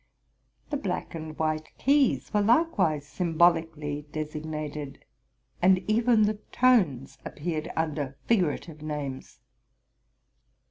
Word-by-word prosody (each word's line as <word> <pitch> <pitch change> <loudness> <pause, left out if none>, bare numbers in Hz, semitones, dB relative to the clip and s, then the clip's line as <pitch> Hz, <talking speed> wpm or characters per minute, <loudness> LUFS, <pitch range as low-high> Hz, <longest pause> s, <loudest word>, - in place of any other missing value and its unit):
The 290 - 0
black 190 -9 -3
and 155 -2 -7
white 155 0 -2
keys 280 -1 +2
were 210 - +3
likewise 205 - +2
symbolically 160 -3 +1
designated, 150 -2 -5 0.6
and 185 +1 +4
even 225 +1 +4
the 210 0 0
tones 195 - +2
appeared 155 0 -4
under 145 -4 -2
figurative 170 -6 0
names. 145 -3 -5
160 Hz, 95 wpm, -27 LUFS, 150-205 Hz, 0.6 s, and